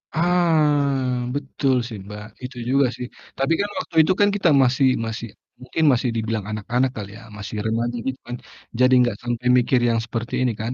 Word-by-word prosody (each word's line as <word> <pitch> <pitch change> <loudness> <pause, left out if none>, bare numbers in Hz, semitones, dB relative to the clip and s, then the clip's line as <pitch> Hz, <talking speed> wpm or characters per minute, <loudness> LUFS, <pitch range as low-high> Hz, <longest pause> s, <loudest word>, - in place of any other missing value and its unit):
Ah, 160 -4 +3 0.4
betul 140 -1 0
sih, 115 -4 -7
Mbak, 105 +1 -8 0.2
itu 125 0 -7
juga 135 +1 +4
sih, 125 - -5 0.3
tapi 135 +5 +1
kan 205 - -2
waktu - - -8
itu 170 - +2
kan 205 - +5
kita 190 -4 +2
masih 130 +1 +3 0.2
masih 115 +1 -5 0.3
mungkin 130 +6 -2
masih 125 0 0
dibilang 110 -1 -2
anak-anak 120 +5 0
kali 100 -2 -6
ya, - - -13 0.2
masih 105 +1 -7
remaja 115 +2 -1
gitu 130 0 -3
kan, 120 - -4 0.4
jadi 130 0 +5
enggak 120 -4 +2
sampai 120 0 -2
mikir 125 +1 +3
yang 115 -1 +1
seperti 115 +1 -5
ini 125 - +2
kan. 115 +3 -3
125 Hz, 185 wpm, -22 LUFS, 115-140 Hz, 0.4 s, kan